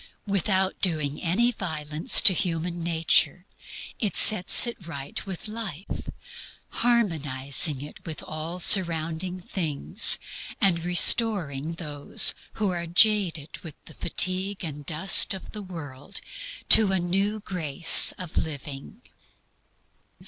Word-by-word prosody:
Without 190 -1 -1
doing 155 -5 -1
any 215 +8 0
violence 155 -7 +2
to 210 -5 +5
human 170 0 -4
nature 165 0 0 0.5
it 210 -4 -2
sets 200 +1 +6
it 235 -7 -8
right 140 -4 -7
with 190 +1 -8
life, 210 -6 -8 0.6
harmonizing 150 - -1
it 150 - -13
with 160 -2 -9
all 160 +3 -8
surrounding 170 -1 +1
things, 175 +2 +1 0.4
and 175 -5 0
restoring 175 - 0
those 150 -4 +2 0.2
who 210 -3 -3
are 170 -1 -5
jaded 175 -4 +1
with 160 -4 -12
the 160 - -14
fatigue 185 +5 -2
and 150 -3 -9
dust 175 +4 +3
of 190 - -12
the 210 - -9
world 165 -2 -9 0.5
to 215 -3 +7
a 190 - 0
new 195 +4 -3
grace 170 -5 +4
of 180 -3 -10
living. 145 - -9
175 Hz, 115 wpm, -24 LUFS, 155-195 Hz, 0.6 s, to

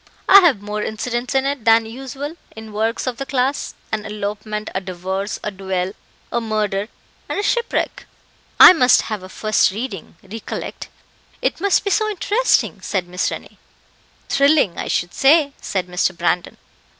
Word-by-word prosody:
I 395 - +10
have 290 - +3
more 210 0 -3
incidents 240 +4 -3
in 265 0 +2
it 280 -3 -2
than 225 0 +5
usual 270 +6 -7 0.2
in 220 -1 -10
works 220 +2 -1
of 255 -2 -3
the 275 - -4
class 265 +1 -1 0.2
an 215 -1 -2
elopement, 210 0 -5
a 190 - -2
divorce, 190 +2 -4
a 210 - -2
duel, 190 -1 -3 0.4
a 235 - 0
murder, 210 -2 -1 0.4
and - - -2
a - - -1
shipwreck." 475 +2 -1 0.5
"I - - +11
must 255 -7 +4
have 215 -3 -4
a 185 - -10
first 215 +2 +2
reading, 205 -4 -6
recollect. 210 +3 -7 0.5
It - - -2
must 400 -1 +2
be 400 - -1
so 430 +1 +2
interesting," 425 +4 +1
said 185 -3 -2
Miss 180 +1 -1
Rennie. - - -9 0.7
"Thrilling, 280 - +3
I - - -3
should 175 - -1
say," 285 +1 +4
said 190 -3 -2
Mr. 180 0 -1
Brandon. 175 +1 -1
220 Hz, 160 wpm, -20 LUFS, 195-270 Hz, 0.7 s, I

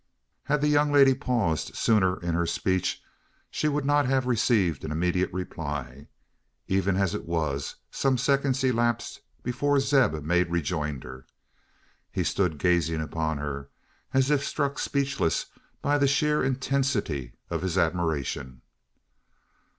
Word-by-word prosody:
Had 150 0 +1
the 150 - +2
young 150 0 +3
lady 140 -2 +6
paused 120 - -1
sooner 95 -5 +2
in 85 -1 -1
her 85 0 0
speech, 95 +1 -1 0.5
she 155 - 0
would 145 -1 0
not 145 -1 +3
have 130 -1 +1
received 110 - +2
an 80 - -4
immediate 90 +3 0
reply. 75 -7 -5 0.6
Even 95 0 +1
as 95 -3 +1
it - - -4
was, 75 -5 -2 0.2
some 135 -2 +1
seconds 135 0 +1
elapsed 120 -2 0 0.2
before 140 +4 +1
Zeb 135 - +3
made 90 +2 +2
rejoinder. 75 -6 -3 0.8
He - - -1
stood 90 -6 0
gazing 80 0 +1
upon 80 0 -2
her, 70 -1 -5 0.4
as 135 +2 +2
if 145 -1 +2
struck 140 0 -1
speechless 140 - 0 0.4
by 145 +1 +2
the 140 - +4
sheer 150 +2 +2
intensity 130 - -1 0.2
of 85 -1 -1
his 95 0 -2
admiration. 80 -7 -1
95 Hz, 135 wpm, -27 LUFS, -, 0.8 s, lady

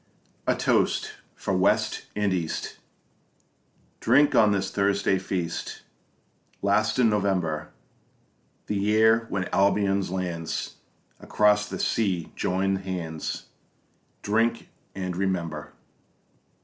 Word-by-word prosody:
A - - +3
toast - - +1 0.2
for - - -2
West - - +1
and 105 -2 +1
East 85 -3 -3 1.2
Drink 145 +5 +4
on 105 -2 +5
this 100 -1 -1
Thursday 100 -1 +1
feast 90 -3 -4 0.8
Last 105 +3 +2
in 125 -2 +5
November, 95 -7 0 1.0
The 105 - -2
year 110 +3 +3
when 95 -2 -2
Albion's 100 -1 +2
lands 90 -3 -3 0.4
Across 105 0 +2
the - - -4
sea 95 -7 0
join 95 +1 0
hands 90 -5 -5 0.8
Drink 115 +3 +1 0.3
and 95 -2 -3
remember! 85 -5 -2
100 Hz, 95 wpm, -26 LUFS, 90-105 Hz, 1.2 s, on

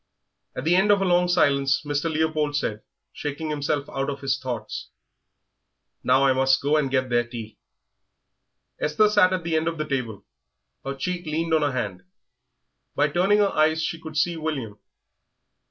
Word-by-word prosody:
At 130 - -4
the 165 +3 +3
end 190 +3 +3
of 205 -1 +5
a 195 - 0
long 180 0 +3
silence 140 -6 +2
Mr. 145 +3 -1
Leopold 155 -2 0
said, 110 -7 -2 0.3
shaking 150 +1 -4
himself 145 -1 -1
out 135 +1 -3
of 140 -1 -5
his 135 -2 0
thoughts, 120 -5 -5 1.1
"Now 130 +2 +4
I 135 - +4
must 130 0 +3
go 145 +2 +1
and 150 -3 +1
get 130 -1 0
their 120 0 +2
tea." 110 -4 -9 1.2
Esther 155 +8 +3
sat 205 -3 +4
at 185 -2 -1
the 165 -1 -1
end 160 +1 +1
of 165 0 -2
the 155 - -2
table; 125 -7 -3 0.6
her 135 0 -4
cheek 175 +4 -4
leaned 160 +2 -1
on 160 - +4
her 145 -1 +1
hand. 100 -7 -3 0.9
By 150 - +2
turning 185 +7 +3
her 205 -1 +3
eyes 155 +1 +2
she 165 0 -3
could 155 -1 -7
see 170 +2 +1
William. 135 -10 -4
150 Hz, 175 wpm, -24 LUFS, 135-165 Hz, 1.2 s, of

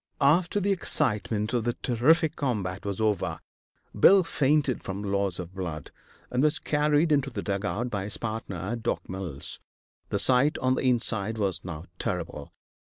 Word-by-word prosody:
After 165 +7 +3
the 200 +1 +1
excitement 105 - 0
of 120 -2 +1
the 120 +1 0
terrific 145 +8 +2
combat 100 -10 -2
was 100 0 -3
over, 105 -3 0 0.6
Bill 190 - +7
fainted 145 -5 +1
from 100 +1 -5
loss 100 -3 0
of 90 0 -7
blood, 85 -6 -5 0.4
and 125 +1 +1
was 150 0 +3
carried 150 +1 +2
into 140 -2 +2
the 120 - -5
dugout 105 +4 -2
by 100 -2 -2
his 105 - -3
partner, 110 -3 -4
Doc. 120 0 -3
Mills. 90 -7 -5 0.5
The - - 0
sight 130 +4 +4
on 130 0 +2
the - - -1
inside 110 -3 -1
was 95 -5 -1
now 85 -2 -6
terrible. - - -4
110 Hz, 160 wpm, -27 LUFS, 95-140 Hz, 0.6 s, Bill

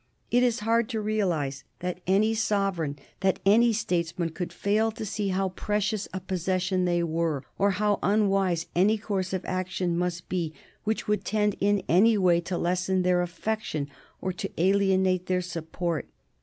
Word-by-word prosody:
It 245 - +4
is 245 -3 +2
hard 230 +1 +2
to 225 -3 -2
realize 180 -11 -1
that 180 0 -4
any 205 +4 +3
sovereign, 195 -9 0 0.2
that 190 -1 +2
any 230 +4 +6
statesman 175 -6 -1
could 175 +2 -5
fail 215 +2 +1
to 220 0 -6
see 205 0 -2
how 190 0 0
precious 210 +2 -1
a 190 - -3
possession 185 0 -1
they 175 -1 +1
were, 160 -4 -1 0.2
or 200 - +4
how 210 -1 +2
unwise 195 -4 +2
any 200 +5 +4
course 195 -3 -2
of 190 -1 -3
action 185 -1 -1
must 175 0 -2
be 170 -4 -2 0.3
which 220 +1 -1
could 210 0 0
tend 210 -1 +1
in 205 0 +2
any 215 +6 +5
way 175 -3 +4
to 175 +1 -3
lessen 180 +2 0
their 180 0 +3
affection 175 -5 -3 0.3
or 185 - -2
to 175 - -4
alienate 190 0 +2
their 185 0 +2
support. 170 -1 -3
185 Hz, 165 wpm, -27 LUFS, 175-210 Hz, 0.3 s, any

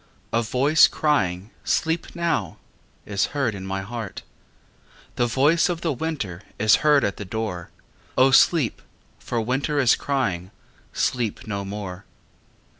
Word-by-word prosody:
A 115 - +3
voice 135 +7 +4
crying 100 - 0
"Sleep 165 +2 -1
now" 170 -1 -1 0.5
Is 100 -1 0
heard 130 -6 +1
in 95 -1 -7
my 95 0 -2
heart. 110 -1 -6 0.9
The 120 - +1
voice 145 +9 +3
of 170 -1 -2
the 165 -3 0
winter 125 - -4 0.2
Is 110 0 +5
heard 150 -3 +4
at 100 - -1
the - - -5
door. 100 -3 -4 0.5
O 130 +1 +5
sleep, 135 -1 +4 0.4
for 120 - -4
the 115 - +1
winter 135 +5 -1
Is 130 -4 +5
crying 95 -11 -2 0.4
"Sleep 120 -5 -1
no 100 -2 -3
more." 95 -2 -6
120 Hz, 140 wpm, -23 LUFS, 100-145 Hz, 0.9 s, Is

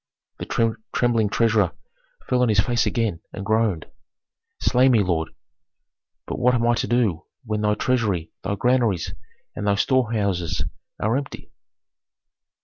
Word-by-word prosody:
The - - -6 0.5
trembling 115 -4 +2
treasurer 105 -4 +2 0.5
fell 125 - +2
on 125 - +3
his 105 -2 +3
face 120 +2 +2
again, 110 -8 -1
and 100 - -6
groaned, 110 -6 +1 0.7
"Slay 130 +1 +4
me, 115 -5 +4
lord! 80 -4 -1 1.0
But - - -5
what 125 0 +3
am 120 -1 +1
I 120 - +4
to 115 - -1
do 110 -9 +1 0.2
when 105 -1 -2
thy 105 0 +2
treasury, 105 -9 0
thy 100 +1 -1
granaries, 120 -6 +1 0.4
and 105 - -3
thy 100 - +3
storehouses 100 - 0 0.4
are 110 +3 +1
empty?" 140 0 -7
110 Hz, 140 wpm, -23 LUFS, 100-120 Hz, 1.0 s, Slay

